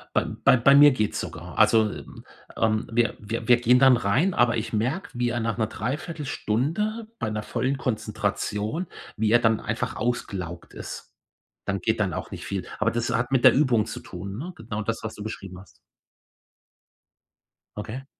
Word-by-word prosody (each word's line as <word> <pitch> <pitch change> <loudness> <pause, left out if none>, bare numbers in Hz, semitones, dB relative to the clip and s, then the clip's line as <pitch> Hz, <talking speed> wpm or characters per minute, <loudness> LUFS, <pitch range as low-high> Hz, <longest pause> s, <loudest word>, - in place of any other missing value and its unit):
Bei - - +3
bei - - +3
bei 140 +4 +6
mir 145 0 +9
geht's 110 -5 -1
sogar. - - -7
Also, 110 -1 +5
hm, - - -10 0.3
ähm, 110 -1 +1
wir 115 -1 +1
wir 115 +2 -5
wir 120 - +7
gehen 120 +1 +4
dann 130 -2 +7
rein, 130 - +1
aber 120 -4 +3
ich 110 - -4
merke, 130 - -1
wie 120 0 0
er 120 0 -1
nach 115 -2 -1
'ner 110 -2 +1
Dreiviertelstunde 150 - -2
bei 110 - -1
'ner 105 0 -3
vollen 135 +5 -1
Konzentration 110 - -2 0.3
wie 110 0 +1
er 120 - +6
dann 115 -2 +2
einfach - - -3
ausgelaugt 95 -7 -4
ist. - - -8 0.5
Dann 100 0 -1
geht 110 0 0
dann 100 -5 0
auch - - -5
nicht - - -7
viel. 100 -2 -3
Aber 115 +1 +2
das 120 0 -1
hat 120 +2 0
mit 130 -2 +2
der - - +9
Übung 125 -7 +3
zu - - -6
tun, 95 +2 -7
ne? 175 +8 -6
Genau 110 -1 -5
das, 115 +2 -2
was 110 - -5
du 105 - -8
beschrieben 95 -4 -7
hast. 95 - -14 2.1
Okay. 125 +6 -6
115 Hz, 180 wpm, -25 LUFS, 105-130 Hz, 2.1 s, mir